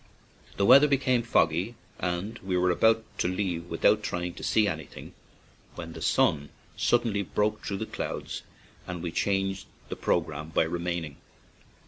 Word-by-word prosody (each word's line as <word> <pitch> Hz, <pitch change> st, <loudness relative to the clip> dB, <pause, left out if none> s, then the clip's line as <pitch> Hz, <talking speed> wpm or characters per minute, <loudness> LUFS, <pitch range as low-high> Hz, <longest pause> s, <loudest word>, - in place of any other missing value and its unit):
The 100 Hz, -, +2 dB
weather 140 Hz, +7 st, +8 dB
became 135 Hz, -3 st, +2 dB
fog 115 Hz, -8 st, +3 dB
gy, 95 Hz, +9 st, -3 dB, 0.2 s
and 95 Hz, +6 st, -3 dB
we 95 Hz, -1 st, -2 dB
were 90 Hz, 0 st, +3 dB
about 110 Hz, +5 st, +3 dB, 0.2 s
to -, -, +2 dB
leave 90 Hz, -2 st, -2 dB
without 105 Hz, +6 st, +3 dB
trying 90 Hz, -3 st, -3 dB
to -, -, -10 dB
see 110 Hz, -1 st, +3 dB
anything, 80 Hz, -7 st, -6 dB, 0.6 s
when 85 Hz, -1 st, -7 dB
the -, -, -9 dB
sun 75 Hz, -1 st, +2 dB, 0.3 s
sud 120 Hz, 0 st, +2 dB
denly 100 Hz, -4 st, -1 dB
broke 105 Hz, +1 st, +1 dB
through 100 Hz, -, -3 dB
the 110 Hz, -, -3 dB
clouds -, -, -5 dB, 0.5 s
and 90 Hz, -1 st, -5 dB
we 85 Hz, -, -3 dB
changed 95 Hz, +1 st, -1 dB, 0.2 s
the -, -, -3 dB
programme 75 Hz, +2 st, -1 dB
by 80 Hz, -, +2 dB
remaining. 85 Hz, -2 st, -3 dB
90 Hz, 160 wpm, -28 LUFS, 85-105 Hz, 0.6 s, weather